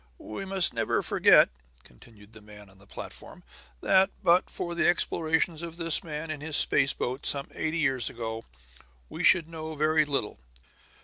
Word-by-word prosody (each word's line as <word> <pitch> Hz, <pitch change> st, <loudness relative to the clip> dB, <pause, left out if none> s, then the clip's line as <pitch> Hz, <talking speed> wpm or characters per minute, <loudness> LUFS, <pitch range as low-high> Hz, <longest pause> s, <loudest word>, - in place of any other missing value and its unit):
"We 110 Hz, -, -8 dB
must 190 Hz, -2 st, +2 dB
never -, -, -1 dB
forget," -, -, +4 dB, 0.3 s
continued 105 Hz, -, -19 dB
the 110 Hz, -, -14 dB
man 105 Hz, -1 st, -15 dB
on 95 Hz, -, -23 dB
the 100 Hz, -, -21 dB
platform, -, -, -11 dB, 0.4 s
"that, 190 Hz, 0 st, +3 dB
but 175 Hz, +2 st, +3 dB
for 175 Hz, -, -6 dB
the 170 Hz, -, 0 dB
explorations 160 Hz, -1 st, 0 dB
of 170 Hz, -1 st, -8 dB
this 165 Hz, -2 st, +1 dB
man 155 Hz, 0 st, -6 dB
and 150 Hz, -2 st, -7 dB
his 155 Hz, 0 st, +2 dB
space 140 Hz, -1 st, +4 dB
boat, 130 Hz, +3 st, -5 dB
some 140 Hz, -1 st, +1 dB
eighty 155 Hz, +1 st, -3 dB
years 135 Hz, -7 st, 0 dB
ago, 115 Hz, -1 st, -6 dB, 0.7 s
we -, -, -6 dB
should 170 Hz, -4 st, +4 dB
know 160 Hz, -1 st, -8 dB
very 155 Hz, +1 st, +2 dB
little. 135 Hz, -, -4 dB
155 Hz, 170 wpm, -27 LUFS, 115-165 Hz, 0.7 s, forget